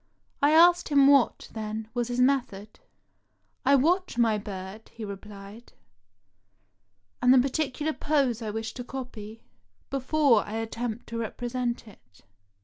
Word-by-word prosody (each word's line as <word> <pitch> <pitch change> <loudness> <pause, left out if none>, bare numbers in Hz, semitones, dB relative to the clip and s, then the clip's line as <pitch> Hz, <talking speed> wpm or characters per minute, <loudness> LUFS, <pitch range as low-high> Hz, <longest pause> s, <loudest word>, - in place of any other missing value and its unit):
I 285 - +5
asked 345 +3 +5
him 280 -2 +5
what, 275 -3 +3
then, 220 0 -5
was 240 -1 -1
his 245 0 -3
method. 250 -6 0 0.4
" - - -47 0.3
I 280 +2 +5
watch 345 +3 +1
my 225 -3 +2
bird," 200 +1 -8
he 225 - -8
replied, 200 +2 -11 1.5
"and 250 0 +5
the 260 - +7
particular 290 +3 0
pose 275 -8 0
I 220 - -4
wish 220 +1 -4
to 245 - -7
copy, 230 -4 -8 0.5
before 275 -3 +2
I 210 - -9
attempt 225 +1 -4
to 230 0 -4
represent 240 +1 -3
it. 190 - -19
240 Hz, 140 wpm, -27 LUFS, 220-275 Hz, 1.5 s, the